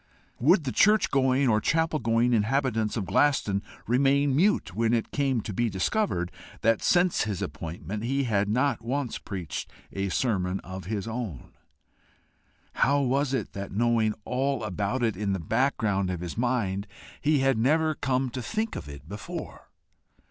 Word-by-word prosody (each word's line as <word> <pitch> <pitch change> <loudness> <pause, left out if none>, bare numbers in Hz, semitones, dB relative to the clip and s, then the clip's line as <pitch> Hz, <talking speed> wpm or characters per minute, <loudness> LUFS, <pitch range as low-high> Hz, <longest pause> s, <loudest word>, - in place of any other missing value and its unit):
Would 160 - +4
the 130 - -2
church 210 - +4
going 135 0 +3
or 110 -2 +3
chapel 160 +2 +1
going 115 +1 +2
inhabitants 115 -1 +1
of 100 - -2
Glaston 105 -6 +2 0.2
remain 135 +3 +3
mute 195 - +2
when 115 +3 +2
it 115 - -2
came 135 -5 +1
to 105 - -6
be 120 +4 +1
discovered 95 - 0 0.3
that 115 0 +3
since 175 -6 +3
his 105 -4 -3
appointment 85 +6 -5
he 135 +3 0
had 105 -4 +1
not 130 +3 +1
once 130 +2 -2
preached 90 -6 -5 0.2
a 100 0 -2
sermon 95 -4 0
of 95 -1 -8
his 105 +2 -3
own? 110 - -5 1.2
How 140 +1 +3
was 135 +1 +1
it 130 -6 -2
that 100 -1 -6
knowing 115 0 +2
all 135 -1 -1
about 105 +5 -2
it 115 -2 +1
in 100 0 -1
the 95 - -2
background 100 - 0
of 90 -2 -3
his 90 -2 -5
mind, 110 -5 -1 0.3
he 150 -2 +3
had 135 -4 +2
never 155 +6 +3
come 130 -2 -1
to 130 - -4
think 220 - -2
of - - -6
it 70 +1 -10
before? 100 +3 -7
115 Hz, 165 wpm, -27 LUFS, 100-135 Hz, 1.2 s, Would